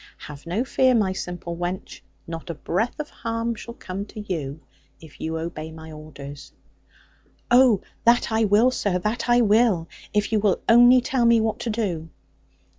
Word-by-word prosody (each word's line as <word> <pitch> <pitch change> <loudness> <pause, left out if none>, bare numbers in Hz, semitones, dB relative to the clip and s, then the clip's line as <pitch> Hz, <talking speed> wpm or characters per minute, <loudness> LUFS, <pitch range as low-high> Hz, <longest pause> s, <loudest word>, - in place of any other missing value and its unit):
Have 150 +2 -11
no 195 +8 0
fear, 260 -1 +3
my 200 -4 +2
simple 175 -2 -5
wench; 175 +2 -5 0.2
not 165 +1 -7
a 170 - -4
breath 220 - -2
of 300 - -5
harm 230 0 -3
shall 235 +1 -9
come 190 +2 -6
to 215 - -8
you, 160 -8 -4 0.4
if 160 -3 -15
you 160 0 -2
obey 160 -1 -5
my 160 0 -11
orders.' 145 -2 -10 1.0
'Oh, 245 -5 +6 0.2
that 235 0 +3
I 220 0 +2
will, 215 +5 +4
sir, 200 -7 0
that 215 +6 -2
I 240 0 +5
will: 210 -6 +3 0.2
if 210 0 0
you 220 - +3
will 200 -3 +1
only 245 +2 +7
tell 250 -1 0
me 235 -1 +5
what 220 -1 -1
to 235 - -3
do.' 185 -8 -2
205 Hz, 175 wpm, -24 LUFS, 165-235 Hz, 1.0 s, only